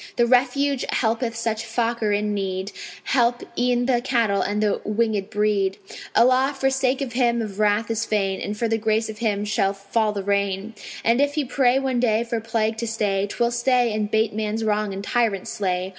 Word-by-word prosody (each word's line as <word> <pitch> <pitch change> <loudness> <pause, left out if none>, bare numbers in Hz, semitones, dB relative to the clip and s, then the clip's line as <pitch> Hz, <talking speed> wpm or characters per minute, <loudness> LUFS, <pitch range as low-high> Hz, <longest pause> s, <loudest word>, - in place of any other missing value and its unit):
The 240 - +3
Refuge 265 +2 +2
helpeth 230 0 0
such 225 -1 -2
Fakir 230 -1 -1
in 210 +1 0
need; 190 0 -3 0.3
Help 240 -2 +1
e'en 245 0 +1
the 245 -2 +2
cattle 230 -6 +1
and 205 +1 -1
the 210 -1 0
winged 210 -2 -1
breed: 205 -2 0 0.4
Allah 260 +3 +4
for 270 0 +1
sake 265 0 0
of 255 -3 -3
him 235 -1 +2
of 210 -3 -5
wrath 210 +2 +2
is 225 0 -1
fain, 195 -4 -1
And 210 +1 -4
for 230 - 0
the 225 0 0
grace 220 +1 0
of 215 -1 -8
him 210 -3 0
shall 210 -2 +1
fall 200 +2 -1
the 200 -1 -4
rain; 200 +1 -1 0.3
And 235 +4 +3
if 285 +1 +1
he 300 -2 0
pray 255 0 +2
one 265 -2 0
day 230 -2 +2
for 235 -1 -2
plague 225 -1 -1
to 235 - -3
stay, 205 -3 0
'Twill 235 +3 0
stay, 240 -1 +2
and 210 -1 -1
'bate 220 0 +1
man's 215 +1 -2
wrong 210 -1 0
and 195 +1 -5
tyrants 220 -4 0
slay. 185 -2 -2
225 Hz, 200 wpm, -23 LUFS, 205-240 Hz, 0.4 s, Allah